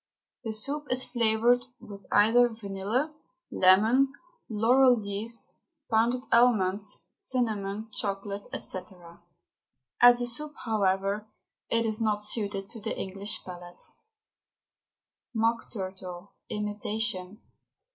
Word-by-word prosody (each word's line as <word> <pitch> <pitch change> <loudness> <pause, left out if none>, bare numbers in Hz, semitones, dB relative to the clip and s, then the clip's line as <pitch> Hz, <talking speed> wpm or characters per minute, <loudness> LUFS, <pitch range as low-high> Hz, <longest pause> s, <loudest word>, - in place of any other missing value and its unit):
The 225 -2 -3
soup 285 +7 -3
is 255 0 +3
flavoured 235 +1 +3 0.2
with 200 -4 -12
either 230 +4 +5
vanilla, 220 +6 -2 0.4
lemon, 220 +9 +5 0.4
laurel 245 +3 +4
leaves, 210 +3 -4 0.3
pounded 235 +3 +2
almonds, 210 -6 +3
cinnamon, 220 -4 -2
chocolate, 200 0 -4
&c. 185 - -5 1.2
As 245 0 +8
a 245 - 0
soup, 290 +5 -2
however, 200 -1 0 0.4
it 230 0 +2
is 220 0 0
not 210 -1 +1
suited 205 -2 0
to 225 - -9
the 220 - -4
English 195 +2 -2
palate. 175 -1 -10 1.6
MOCK 225 +1 +1
TURTLE, 185 -2 -7 0.2
IMITATION. 210 -1 -2
215 Hz, 100 wpm, -28 LUFS, 200-235 Hz, 1.6 s, As